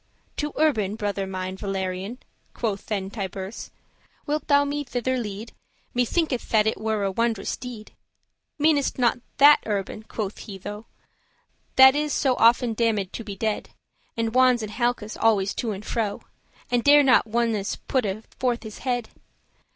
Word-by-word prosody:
"To 295 0 -2
Urban? 220 -11 +2
brother 205 -3 -2
mine 185 0 -4
Valerian," 195 +2 -3 0.4
Quoth 210 -4 -3
then 195 -3 -3
Tiburce; 195 -1 -6 0.6
"wilt 300 0 -2
thou 285 0 +4
me 290 +1 -2
thither 255 0 -2
lead? 220 -2 -5 0.4
Me 245 0 +2
thinketh 300 -2 -1
that 215 -2 +4
it 220 - -1
were 220 -2 0
a 195 - 0
wondrous 225 -1 -1
deed. 240 -4 -9 0.7
"Meanest 295 -2 +2
thou - - -5
not 240 +1 +3 0.2
that 290 +1 +8
Urban," 205 0 -2
quoth 215 -2 -5
he 200 -3 -8
tho,* 205 +3 -8 0.9
*then 265 0 +9
"That - - -7
is 300 0 0
so 265 -3 +2
often 235 0 +4
damned 215 -4 0
to 230 - -5
be 205 -2 -7
dead, 215 +1 -3 0.4
And 225 -1 -1
wons* 255 -2 +4
in 215 - -4
halkes 240 -2 -1
always 205 -3 +3
to 235 - -3
and 205 0 -5
fro, 230 - 0
*dwells - - -21
corners - - -32
And 240 -1 +2
dare 290 0 +7
not 255 -3 +4
ones 225 -3 0
putte 220 -5 -2
forth 245 -2 0
his 215 -2 -9
head? 245 -3 -2
225 Hz, 170 wpm, -25 LUFS, 205-255 Hz, 0.9 s, then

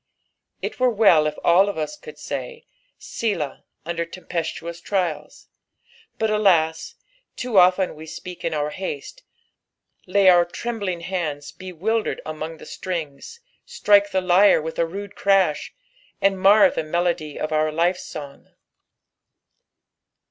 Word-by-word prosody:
It - - -4
were 255 -1 +3
wcli 195 -9 +5
if 150 - -4
all 190 +4 +5
of 200 - -5
us 155 - -3
could 465 +8 -12
say, 475 -1 -6 0.2
" - - -46
Bdah,'" 190 -11 -3 0.2
under 170 0 -2
tempestuous 170 0 -5
trials, 170 -7 -3 0.7
but 220 -1 0
alas! 170 -7 +2 0.4
too 245 -6 +2
often 185 +1 +4
we 155 +1 -11 0.2
;peak 180 -1 -9
in 165 - -1
our 150 -1 -1
haste, 185 - -6 0.9
lay 195 +1 +3
our 175 -1 +7
trembling 195 -1 -4
bands 160 -5 -4
bewildered 185 +5 -2
among 155 +1 -6
the - - -12
strings, 175 - -6 0.2
strike 205 -1 +3
the 190 -1 0
lyre 185 +2 +5
with 160 +1 -6
a 165 - +2
rude 200 +3 -7
crash, 195 -6 +1 0.5
and 195 -1 +2
mar 200 +3 +6
the - - -2
melody 165 -2 -2
of 155 - -3
our 155 0 +1
life.«ong. 155 -4 -3
180 Hz, 135 wpm, -22 LUFS, 160-200 Hz, 0.9 s, our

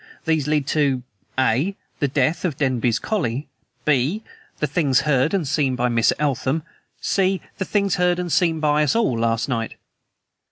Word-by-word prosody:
These 160 -3 +1
lead 150 -2 +1
to: 140 -5 +1 0.3
"(a) 130 - +2 0.2
The 145 - +2
death 140 +3 0
of 165 -7 -1
Denby's 125 -5 +1
collie; 145 - -2 0.4
"(b) 150 - +1 0.3
The - - 0
things 145 -3 +2
heard 140 0 +2
and 185 -7 0
seen 140 -2 +1
by 125 0 +1
Miss 115 -1 +3
Eltham; 145 +1 0 0.4
"(c) 190 -1 +1 0.2
The 190 - -1
things 200 -2 +1
heard 180 -1 +2
and 180 -1 -3
seen 165 -2 +2
by 150 -1 +2
us 150 +4 +2
all 225 - +2
last 115 0 +1
night. 115 -4 -2
150 Hz, 165 wpm, -22 LUFS, 130-170 Hz, 0.4 s, Miss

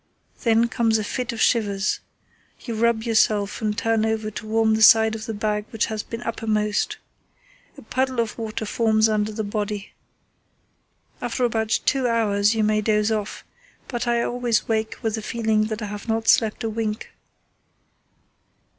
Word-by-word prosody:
Then 230 -1 +3
comes 230 -2 +1
a 215 - -2
fit 250 +3 -3
of 230 - -7
shivers. 205 -4 +1 0.6
You 235 - -5
rub 225 0 +1
yourself 215 -3 +1
and 210 -1 -1
turn 225 -1 +1
over 220 -1 -1
to 215 - -7
warm 220 0 +2
the 220 - 0
side 220 +1 +7
of 220 0 -6
the 225 - -3
bag 210 0 -1
which 225 - 0
has 215 - -2
been 230 +2 -7
uppermost. 215 -2 -1 0.8
A - - -12
puddle 260 -1 -1
of 230 -2 -1
water 220 -1 -4
forms 220 0 +2
under 215 0 0
the 215 +1 -3
body. 205 0 -4 1.3
After 245 +1 -1
about 220 -2 0
two 265 -3 +2
hours 215 -2 +2
you 220 - +1
may 215 0 +2
doze 210 0 +1
off, 215 -1 -3 0.4
but 240 -1 -3
I 235 0 +2
always 240 -2 0
wake 220 -1 -1
with 220 -1 0
the 220 - -3
feeling 220 -1 0
that 215 0 -4
I - - -2
have 205 +1 -7
not 225 0 -1
slept 220 +1 +3
a 225 - -1
wink." 220 -1 -3
220 Hz, 170 wpm, -23 LUFS, 215-230 Hz, 1.3 s, side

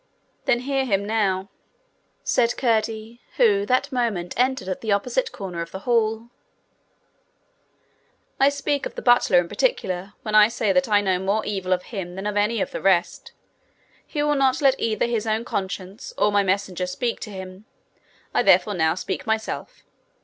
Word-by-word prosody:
'Then 240 -1 +2
hear 270 +1 0
him 200 -5 0
now,' 200 -3 0 0.8
said 240 -1 +1
Curdie, 225 -1 -1 0.2
who 205 -4 +3
that 255 +3 +1
moment 225 -9 -1
entered 255 -5 0
at 185 - -3
the 220 - -2
opposite 250 - 0
corner 180 -4 -6
of 170 - -5
the 190 - -8
hall. 225 -1 +1 2.1
'I 275 +1 +6
speak 285 0 -1
of - - -17
the - - -6
butler 245 -7 +5
in 175 -1 +3
particular 195 - -1
when 215 - -4
I 210 0 +8
say 220 -3 0
that 270 -3 +2
I 205 -1 +4
know 190 -2 +1
more 200 +3 0
evil 190 -3 -3
of 180 0 +1
him 185 -5 -6
than 190 +1 -6
of 210 0 -2
any 210 +1 +1
of - - -2
the - - -5
rest. 185 -3 +1 0.7
He 295 -2 -2
will 295 0 +2
not 270 -2 +2
let 270 -2 +3
either 215 -2 0
his 230 -2 -2
own 220 +2 0
conscience 195 - -5
or 210 - +3
my 205 0 +3
messenger 190 -2 -1
speak 230 +6 -2
to 215 - -7
him: 190 0 -9 0.7
I - - +3
therefore 210 - +4
now 160 -3 +1
speak 190 +3 -4
myself. 220 0 -3
215 Hz, 175 wpm, -23 LUFS, 190-240 Hz, 2.1 s, I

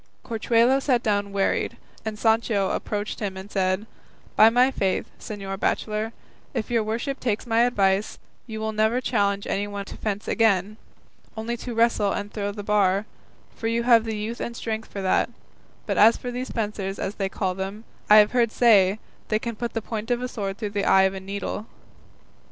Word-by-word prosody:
Corchuelo 235 +3 +3
sat 250 -4 +1
down 205 -2 0
wearied, 195 -1 0 0.3
and 220 -1 -4
Sancho 220 -3 +2
approaching 205 -1 -3
him 190 +1 -8
said, 190 0 0 0.5
"By 220 - +8
my 250 +3 +4
faith, 190 -7 0
señor 195 -2 -6
bachelor, 215 +2 -1 0.4
if 220 - -2
your 230 -1 +3
worship 235 +6 -3
takes 225 -2 -1
my 230 -1 +1
advice, 200 -4 +1 0.3
you 220 -2 -5
will 220 0 -2
never 220 +3 +2
challenge 200 -5 0
anyone 200 0 -3
to - - -9
fence 210 -1 -3
again, 210 -2 +2 0.6
only 225 +2 -2
to 240 0 -6
wrestle 230 -3 +2
and 205 0 -5
throw 205 -1 -2
the 205 0 -7
bar, 200 -1 +2 0.5
for 225 - -3
you 230 +1 0
have 235 -2 +6
the 220 -1 -3
youth 220 +3 -4
and 235 0 -4
strength 220 -1 -4
for 195 - -5
that; 190 - +2 0.6
but - - -1
as 225 +3 +7
for 245 - -5
these 250 +1 -4
fencers 205 -3 -3
as 195 - -3
they 195 - 0
call 190 -1 -1
them, 195 +3 -5 0.3
I 210 - +9
have 210 -1 +7
heard 235 -3 +2
say 205 -5 +5 0.3
they 215 - +2
can 235 +1 -4
put 235 +2 -4
the 225 - -3
point 220 0 -5
of 245 -1 +1
a - - -1
sword 200 -5 -4
through 210 -2 -4
the 205 -1 -1
eye 190 - +6
of 190 0 +2
a 190 - -5
needle." 200 +2 -5
215 Hz, 190 wpm, -24 LUFS, 200-230 Hz, 0.6 s, I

